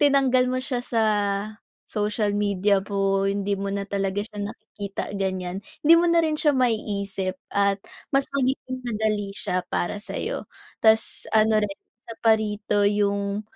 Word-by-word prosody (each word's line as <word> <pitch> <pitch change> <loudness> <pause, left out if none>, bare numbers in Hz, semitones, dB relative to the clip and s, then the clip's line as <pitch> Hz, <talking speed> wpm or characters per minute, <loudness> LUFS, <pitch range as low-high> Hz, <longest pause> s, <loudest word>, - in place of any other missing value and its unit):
tinanggal 270 -3 +4
mo 255 - 0
siya 260 -2 -2
sa 230 -2 0 0.9
social 210 0 0
media 200 -1 +2
mo, 195 -1 +1
hindi 200 0 0
mo 195 0 -2
na 200 - -1
talaga 195 0 -1
siya 210 -1 -10
nakikita 205 -1 -6
ganyan, 185 -1 -2 0.2
hindi 325 +3 +8
mo 345 - +3
na 335 0 +4
rin 315 -2 +1
siya 295 -2 +4
maiisip 200 -6 -1 0.2
at 200 0 +2 0.3
mas 275 0 +2
magiging 260 -1 -1
madali 215 -3 -1
siya 180 -2 -1
para 175 - 0
sa'yo. 205 - -4 0.4
Tas 220 0 +3
ano 215 0 +5
rin, 195 -1 -5 0.3
isa 230 - -8
pa 225 -1 +6
rito 210 -1 0
yung 200 0 0
210 Hz, 150 wpm, -25 LUFS, 200-235 Hz, 0.9 s, hindi